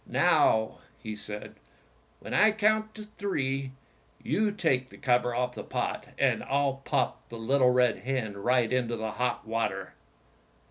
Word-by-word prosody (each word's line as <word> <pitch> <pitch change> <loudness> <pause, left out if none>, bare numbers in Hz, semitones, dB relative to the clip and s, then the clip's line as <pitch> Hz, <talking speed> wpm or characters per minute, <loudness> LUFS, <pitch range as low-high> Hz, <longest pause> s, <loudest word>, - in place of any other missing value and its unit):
"Now," 110 0 +3 0.2
he 110 -1 -6
said, 105 0 -6 0.7
"when - - -7
I 215 +1 +5
count 215 0 +1 0.2
three, 135 -9 -1 0.5
you 210 +1 +1
take 130 -10 0
the - - -14
cover 125 -2 +1
off 125 0 -1
the - - -7
pot, - - -3
and - - +2
I'll 140 -1 +1
pop - - -1
the 115 - -7
little 125 +3 +3
red 125 -2 +3
hen 125 -5 -2
right 120 +3 +2
into 120 -2 0
the 110 0 -3
hot 125 0 -2
water." 95 -4 -2
125 Hz, 145 wpm, -28 LUFS, 115-140 Hz, 0.7 s, I